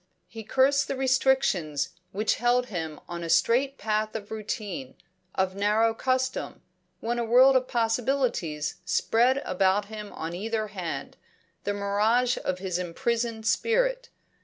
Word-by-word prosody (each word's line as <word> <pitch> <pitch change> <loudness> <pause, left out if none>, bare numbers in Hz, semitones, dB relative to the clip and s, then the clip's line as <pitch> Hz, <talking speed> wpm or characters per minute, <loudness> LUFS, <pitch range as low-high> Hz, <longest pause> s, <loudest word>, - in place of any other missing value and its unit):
He 225 -1 -9
cursed 270 +5 +3
the 275 - -2
restrictions 255 - +1 0.2
which 210 +3 0
held 245 +1 +2
him 160 -5 -4
on 170 0 -5
a 165 - -5
straight 265 +9 +3
path 215 0 -1
of 210 -1 -6
routine, 205 - -5 0.4
of 190 0 +1
narrow 210 +3 +2
custom, 260 +2 -2 0.4
when 240 +1 -1
a - - 0
world 255 +4 +6
of 255 0 +2
possibilities 230 - 0
spread 235 +7 +2
about 190 +2 +1
him 210 -1 -7
on 165 +1 -5
either 215 +3 -2
hand, 185 -5 -5 0.5
the 205 - 0
mirage 215 +5 +2
of 185 - -1
his 185 -1 -3
imprisoned 225 +5 -2
spirit. - - +1
220 Hz, 135 wpm, -27 LUFS, 190-250 Hz, 0.5 s, world